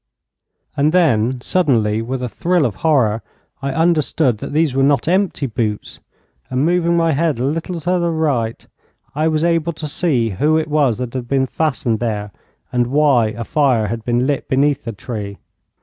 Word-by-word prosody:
And 150 +3 +2
then, 130 -8 +2
suddenly, 115 -11 +1
with 125 +2 -4
a - - -1
thrill 175 +4 0
of 110 -6 -3
horror, 125 -9 +2 0.4
I 140 - -2
understood 155 -6 +1
that - - -6
these 155 -2 +1
were 135 - +1
not 140 -1 +2
empty 185 -4 +1
boots; 110 -4 -3 0.5
and 130 +3 0
moving 170 0 +2
my 165 -1 +2
head 155 -1 0
a 120 - -2
little 165 +4 -2
to 180 +3 0
the 170 0 0
right, 140 -9 -1 0.5
I 155 +2 0
was 155 0 0
able 170 -1 +1
to 155 0 -6
see 140 -8 0
who 150 - +2
it 160 -1 -2
was 145 -6 +2
that 125 -1 -5
had 125 -2 -4
been 135 0 +1
fastened 125 -6 -1
there, 105 -3 -3 0.4
and 120 -1 +1
why 135 -4 +3
a 110 +2 -5
fire 125 -6 +1
had 115 0 -4
been 120 +1 +1
lit 140 -1 -1
beneath 140 +1 +1
the 115 - -3
tree. 105 -2 -6
140 Hz, 180 wpm, -18 LUFS, 115-160 Hz, 0.5 s, why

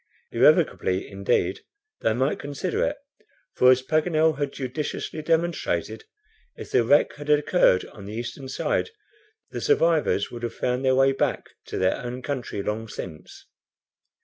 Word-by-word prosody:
Irrevocably, 95 +1 +3
indeed, 100 0 0 0.4
they - - +1
might 130 +4 0
consider 145 +5 -2
it, 290 - -1 0.6
for 125 - +5
as 130 0 +5
Paganel 155 0 +2
had 145 -1 -1
judiciously 140 +4 -4
demonstrated, 170 - -1 0.5
if - - -10
the - - +4
wreck 145 +6 +4
had 145 0 -8
occurred 150 - +4
on 100 - -12
the 105 - -7
eastern 120 +3 -6
side, - - -1 0.6
the - - -5
survivors 165 - +2
would 120 - -7
have 120 -1 -4
found 125 +1 -1
their 130 -1 +3
way 135 +1 +4
back 135 - -1 0.2
to - - -5
their 95 0 +2
own 125 +1 -6
country 130 -8 -4
long 110 +2 -3
since. 80 -7 -9
135 Hz, 150 wpm, -25 LUFS, 115-155 Hz, 0.6 s, for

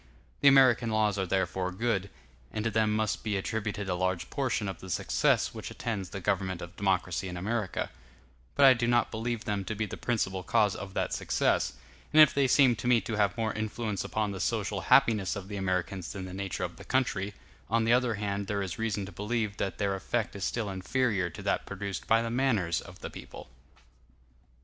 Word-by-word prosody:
The 145 - +4
American 130 -4 +6
laws 105 -2 +1
are 95 - -1
therefore 95 0 0
good, 100 -1 -1 0.4
and 110 - -3
to 115 - +1
them 110 0 +2
must 110 -1 -1
be 105 -2 -1
attributed 105 0 -3
a 90 - 0
large 95 -1 -1
portion 130 -7 -1
of 95 - -5
the 95 - -10
success - - +1
which - - -6
attends 100 -6 -4
the 100 - -6
government 95 0 -1
of 85 -1 -9
democracy 95 -2 0
in 90 -1 -5
America: 105 0 -2 0.6
but 140 - +6
I 130 - +9
do 120 -1 -1
not 120 0 +2
believe 115 0 -3
them 100 -2 -1
to 105 - -3
be 110 +1 -1
the 105 - -7
principal 95 -6 -1
cause 100 +3 +2
of 100 -1 -8
that - - -1
success; - - +1 0.4
and 155 - +5
if 155 -2 +8
they 140 -1 +3
seem 130 -2 +5
to 125 - -4
me 125 -1 +5
to 110 +2 -4
have 105 +1 +2
more 110 -2 0
influence 110 -2 -3
upon 105 -2 -1
the 95 - -6
social 105 -3 -1
happiness 110 -3 +4
of 100 -1 -7
the 105 - -5
Americans 95 -1 -2
than 95 -2 -5
the 90 - -8
nature 95 -2 -3
of - - -4
the - - -10
country, 105 -6 0 0.3
on 115 +1 +2
the 115 - +4
other 125 -2 +2
hand 100 -1 -3
there 100 0 -1
is 95 0 -5
reason 105 -3 -1
to 95 - -9
believe 105 0 -2
that 100 - -2
their 100 -2 0
effect 105 +3 -2
is 100 - -5
still 110 -3 -1
inferior 95 0 0
to - - -10
that - - 0
produced 100 0 -5
by 115 +1 +4
the 115 - -3
manners 110 -10 +1
of - - -13
the - - -5
people. - - -10
105 Hz, 210 wpm, -29 LUFS, 95-115 Hz, 0.6 s, I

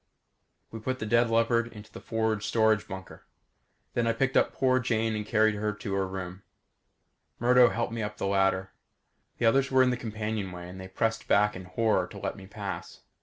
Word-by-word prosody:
We 115 - -6
put 130 +4 -2
the 110 - -4
dead 115 +2 +3
leopard 115 +1 +2
into 105 -1 -12
the - - -10
forward 110 -2 -1
storage 110 -1 +2
bunker. 95 0 -9 0.7
Then 120 -1 +1
I 115 - +3
picked 135 +2 0
up - - +4
poor 130 -1 +2
Jane 115 -3 0
and 105 -1 -4
carried 110 0 +3
her 105 +1 -2
to 105 -1 -5
her 95 -1 0
room. 95 0 -6 1.0
Murdo 125 +1 +5
helped 115 -1 -2
me 115 - -3
up 105 0 -4
the - - -3
ladder. 95 -1 +1 0.7
The 120 - 0
others 135 +4 +3
were 130 -1 +5
in 125 - +3
the 125 - -1
companionway 105 -6 -4
and 95 +1 -9
they 95 - -7
pressed 115 +4 -1
back 105 +1 +3
in 90 0 -8
horror 95 -1 +1
to - - -11
let 95 - -3
me 95 -1 -12
pass. 100 -1 -7
110 Hz, 200 wpm, -28 LUFS, 95-115 Hz, 1.0 s, Murdo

